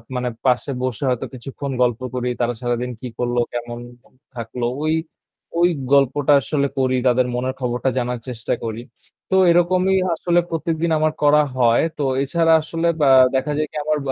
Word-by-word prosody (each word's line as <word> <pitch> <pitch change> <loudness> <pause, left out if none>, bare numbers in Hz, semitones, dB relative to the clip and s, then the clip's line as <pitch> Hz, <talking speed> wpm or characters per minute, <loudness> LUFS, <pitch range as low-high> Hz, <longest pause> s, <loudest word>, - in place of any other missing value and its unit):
মানে 125 0 -1 0.2
পাশে 130 +2 +1
বসে 130 0 -3
হয়তো 125 -2 -1
কিছুক্ষণ 135 +2 -6
গল্প 120 -2 +2 0.2
করি। 125 0 -1
তারা 120 0 +1
সারাদিন 120 0 -2
কি 130 - -5
করলো 120 0 0
কেমন 120 0 -5 0.6
থাকলো। 120 +1 -4 0.2
ওই, 155 0 +1 0.7
ওই 175 +1 +5 0.2
গল্পটা 140 +1 +3
আসলে 140 0 0
করি, 130 -1 +1
তাদের 125 0 +3
মনের 130 +1 -2
খবরটা 125 +1 -1
জানার 125 -1 -1
চেষ্টা 115 -3 -3
করি। 115 0 -4 0.5
তো 190 - +3 0.2
এরকমই 180 +2 +3 0.2
আসলে 175 +1 +1
প্রত্যেকদিন 165 0 -1
আমার 155 0 +2
করা 150 +1 +5 0.2
হয়। 120 -2 +4
তো 145 - -2 0.2
এছাড়া 165 +3 +2
আসলে 165 +2 -2 0.2
আ - - +6 0.3
দেখা 130 +3 0
যায় 155 0 0
কি - - -16
আ - - -2
আমার 155 0 +1
130 Hz, 170 wpm, -20 LUFS, 120-155 Hz, 0.7 s, আ